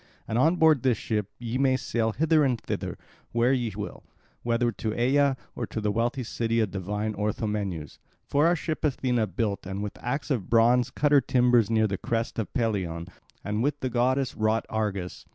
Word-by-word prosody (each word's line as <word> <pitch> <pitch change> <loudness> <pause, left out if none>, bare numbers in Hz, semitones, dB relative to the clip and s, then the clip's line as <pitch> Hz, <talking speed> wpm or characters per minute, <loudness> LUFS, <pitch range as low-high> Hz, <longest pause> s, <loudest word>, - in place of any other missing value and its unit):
And - - -3
on 160 +6 +4
board 160 -5 +4
this 125 -3 +2
ship 105 -3 -2
ye 120 +1 -3
may 130 -1 +3
sail 115 -3 -1
hither 160 +2 +3
and 125 -4 +1
thither, - - -4 0.4
where 120 +3 +3
ye 120 -4 0
will, - - -6 0.4
whether 120 0 +1
to 110 - -4
Aea 135 +2 +3 0.2
or 120 - -3
to - - -4
the 105 -1 0
wealthy 120 +4 0
city 115 0 -1
of 110 -4 +1
divine 105 +3 -3
Orthomenus. 105 -6 -3 0.3
For 145 +3 +3
our 175 - +4
ship 155 -1 -4
Athena 125 -6 +1
built 100 +1 -2
and 95 +2 -4
with 105 - -7
axe 140 +5 -2
of 115 -9 -1
bronze 120 +2 +4
cut 145 +3 0
her 145 -2 +7
timbers 125 -3 +3
near 110 -1 +3
the 100 -3 -2
crest 115 0 -2
of 110 - -3
Pelion, 95 -8 -1 0.3
and 105 +2 -2
with 145 +3 0
the 130 - -2
goddess 130 +2 +1
wrought 110 +1 +1
Argus. 100 -5 -3
115 Hz, 190 wpm, -27 LUFS, 105-130 Hz, 0.4 s, her